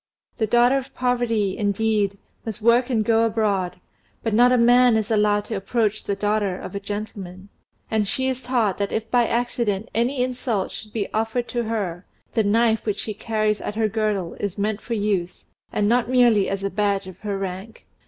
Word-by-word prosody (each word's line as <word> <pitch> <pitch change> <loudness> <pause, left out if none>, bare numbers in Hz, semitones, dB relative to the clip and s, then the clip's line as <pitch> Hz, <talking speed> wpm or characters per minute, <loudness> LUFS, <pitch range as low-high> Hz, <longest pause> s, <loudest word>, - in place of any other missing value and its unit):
The 220 - +1
daughter 240 +4 +4
of 265 - -11
poverty, 240 -6 0
indeed, 205 -1 0 0.3
must 220 -3 -5
work 235 +3 +3
and 220 -4 +1
go 225 0 +3
abroad, 210 -6 0 0.4
but 225 - -1
not 245 +3 +5
a 250 - +4
man 245 0 +5
is 220 +1 -2
allowed 210 -1 +2
to 220 - -4
approach 215 +2 -1
the 200 - -1
daughter 205 -2 0
of - - -8
a 200 - -3
gentleman; 200 -2 -7 0.4
and 215 -2 +1
she 260 +6 -1
is 260 -1 -2
taught 230 -8 0
that 200 -1 -1
if 225 0 -3
by 240 -2 +3
accident 235 -3 -1
any 250 +3 +1
insult 245 -5 -2
should 210 +2 -8
be 210 -2 -2
offered 225 +2 -1
to 240 -1 -2
her, 195 -5 -3 0.3
the 225 - +2
knife 225 +2 +2
which 210 -2 -1
she 215 - -3
carries 215 0 -1
at 210 - -4
her 220 0 +2
girdle 210 -5 -1
is 200 -1 -3
meant 205 +1 -1
for 235 - -3
use, 200 -4 -2 0.3
and 205 - +1
not 240 +1 +2
merely 240 -6 +4
as 195 0 -3
a 195 - -1
badge 200 -1 0
of 185 -1 -11
her 205 -1 -3
rank. 195 +3 -6
215 Hz, 195 wpm, -23 LUFS, 200-235 Hz, 0.4 s, not